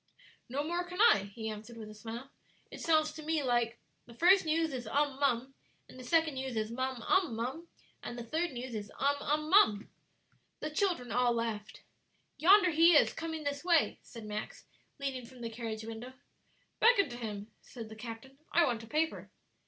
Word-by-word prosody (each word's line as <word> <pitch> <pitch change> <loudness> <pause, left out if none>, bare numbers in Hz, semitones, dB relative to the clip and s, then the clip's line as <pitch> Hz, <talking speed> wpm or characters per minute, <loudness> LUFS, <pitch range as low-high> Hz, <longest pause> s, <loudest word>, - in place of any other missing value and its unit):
"No 275 +4 -1
more 345 +3 -1
can 360 +1 -8
I," 200 - +5
he 220 -1 -5
answered, 220 +2 -7
with 220 -2 -8
a 215 - -10
smile; 230 +4 -8 0.4
"it - - -9
sounds 310 -2 +3
to 310 - -9
me 310 -1 0
like 240 -2 +1 0.3
'The 235 - -13
first 365 +7 +5
news 320 -1 +1
is 245 -3 -5
um 285 +1 0
mum, 265 -1 +1 0.3
and 255 - -13
the - - -8
second 320 +3 +2
news 265 -2 -4
is 215 0 -1
mum 260 0 -3
um 365 -11 +2
mum, 260 +9 -4 0.3
and 240 - -6
the 240 - -5
third 320 +8 -1
news 250 -1 -6
is 210 -1 -5
um 285 +1 +2
um 305 +1 -1
mum." 215 - +5 0.7
The 305 - -4
children 310 - 0
all 245 -1 +3
laughed. 225 -2 -4 0.6
"Yonder 370 +2 +6
he 330 +2 +6
is, 290 - +5
coming 320 -1 -5
this 285 0 -3
way," 340 -3 +3
said 230 -3 -11
Max, 210 0 -6 0.3
leaning 270 -2 -3
from 255 0 -14
the 230 -1 -4
carriage 225 -1 -5
window. 225 +3 -7 0.7
"Beckon 440 -6 +5
to 240 - -7
him," 215 -2 -6
said 230 -3 -9
the 220 - -10
captain; 235 +4 -9
"I 340 0 +5
want 240 -5 -1
a - - -11
paper." 315 +4 -1
260 Hz, 190 wpm, -32 LUFS, 230-315 Hz, 0.7 s, Yonder